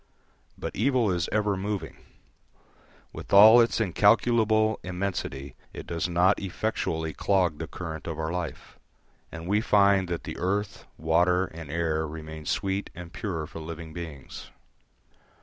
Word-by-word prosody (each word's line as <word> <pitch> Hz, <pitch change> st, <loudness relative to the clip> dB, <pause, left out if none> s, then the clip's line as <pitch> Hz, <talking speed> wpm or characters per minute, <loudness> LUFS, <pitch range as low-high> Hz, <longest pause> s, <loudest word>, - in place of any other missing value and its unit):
But -, -, -6 dB
evil 120 Hz, -2 st, +2 dB
is 85 Hz, -2 st, -1 dB
ever 105 Hz, -1 st, +1 dB
moving; 95 Hz, -3 st, -4 dB, 1.2 s
with -, -, -9 dB
all 110 Hz, +4 st, +9 dB
its 115 Hz, -3 st, +1 dB
incalculable 110 Hz, +2 st, +3 dB
immensity 90 Hz, -8 st, -4 dB, 0.2 s
it -, -, -8 dB
does 85 Hz, +1 st, -2 dB
not 90 Hz, +3 st, +3 dB
effectually 85 Hz, -5 st, -2 dB
clog 90 Hz, -6 st, +1 dB
the 80 Hz, -, -4 dB
current 80 Hz, -4 st, -7 dB
of 80 Hz, -2 st, -4 dB
our 80 Hz, 0 st, -2 dB
life; 85 Hz, -6 st, -6 dB, 0.5 s
and 85 Hz, 0 st, -8 dB
we 105 Hz, +4 st, +1 dB
find 100 Hz, -4 st, +3 dB
that 85 Hz, -1 st, -4 dB
the -, -, -6 dB
earth, 100 Hz, +3 st, -2 dB
water, 90 Hz, +4 st, +2 dB
and 80 Hz, -4 st, -10 dB
air 80 Hz, -1 st, -1 dB
remain 80 Hz, 0 st, -8 dB
sweet 95 Hz, 0 st, -1 dB
and 90 Hz, 0 st, -10 dB
pure 90 Hz, -9 st, -4 dB
for 80 Hz, -, -9 dB
living 80 Hz, 0 st, -8 dB
beings. 80 Hz, -5 st, -8 dB
90 Hz, 140 wpm, -27 LUFS, 80-100 Hz, 1.2 s, all